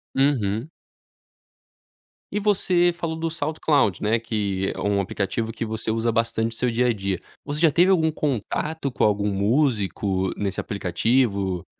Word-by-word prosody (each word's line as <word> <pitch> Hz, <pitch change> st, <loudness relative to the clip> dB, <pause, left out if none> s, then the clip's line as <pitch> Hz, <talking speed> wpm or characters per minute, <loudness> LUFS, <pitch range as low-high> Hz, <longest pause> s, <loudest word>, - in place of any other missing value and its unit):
Uhum. 125 Hz, -3 st, +1 dB, 1.6 s
E 210 Hz, -, -1 dB
você 185 Hz, -4 st, +3 dB
falou 170 Hz, -1 st, -3 dB
do 165 Hz, +1 st, -2 dB
SoundCloud, 145 Hz, -, +1 dB
né? 110 Hz, +2 st, +2 dB
Que 100 Hz, -4 st, -2 dB
é -, -, -7 dB
um 100 Hz, -1 st, +1 dB
aplicativo 100 Hz, +3 st, -2 dB
que 115 Hz, -, -5 dB
você 110 Hz, 0 st, -4 dB
usa 115 Hz, +1 st, 0 dB
bastante 115 Hz, 0 st, 0 dB
o -, -, -7 dB
seu 125 Hz, +1 st, 0 dB
dia 120 Hz, +2 st, +1 dB
a 120 Hz, -, +3 dB
dia. 100 Hz, -3 st, -2 dB, 0.3 s
Você 150 Hz, +2 st, -3 dB
já 165 Hz, -, +5 dB
teve 175 Hz, +5 st, +4 dB
algum 160 Hz, -4 st, +3 dB
contato 150 Hz, +2 st, -2 dB
com -, -, +1 dB
algum 105 Hz, -1 st, +1 dB
músico 100 Hz, -4 st, +1 dB
nesse 100 Hz, -2 st, -2 dB
aplicativo? 100 Hz, 0 st, 0 dB
115 Hz, 155 wpm, -24 LUFS, 100-150 Hz, 1.6 s, já